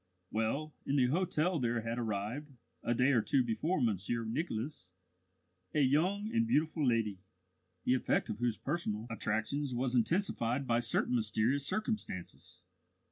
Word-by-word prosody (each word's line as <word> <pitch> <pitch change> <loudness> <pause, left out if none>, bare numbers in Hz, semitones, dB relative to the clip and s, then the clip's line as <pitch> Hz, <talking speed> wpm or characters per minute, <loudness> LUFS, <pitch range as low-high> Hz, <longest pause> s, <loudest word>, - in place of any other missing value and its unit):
Well, 135 +8 -1
in 140 - -1
the 130 -3 +5
hotel 175 +1 +1
there 120 -2 0
had 115 +2 -3
arrived, 110 +6 -3 0.3
a 120 - 0
day 125 +4 +4
or 120 -4 +4
two 130 +4 +2
before 150 +10 0
Monsieur 115 0 0
Nicholas, 115 - -4 0.8
a 150 - +4
young 175 +10 +2
and 230 0 +2
beautiful 160 -6 +1
lady, 110 -5 +1 0.6
the 125 - +3
effect 130 - +1
of 105 - -4
whose 120 -2 0
personal 110 -11 -2
attractions 115 +5 -1
was 125 +1 0
intensified 130 - +1
by 120 -1 +2
certain 120 +1 +1
mysterious 120 +4 +1
circumstances. 215 - -3
125 Hz, 140 wpm, -33 LUFS, 115-150 Hz, 0.8 s, the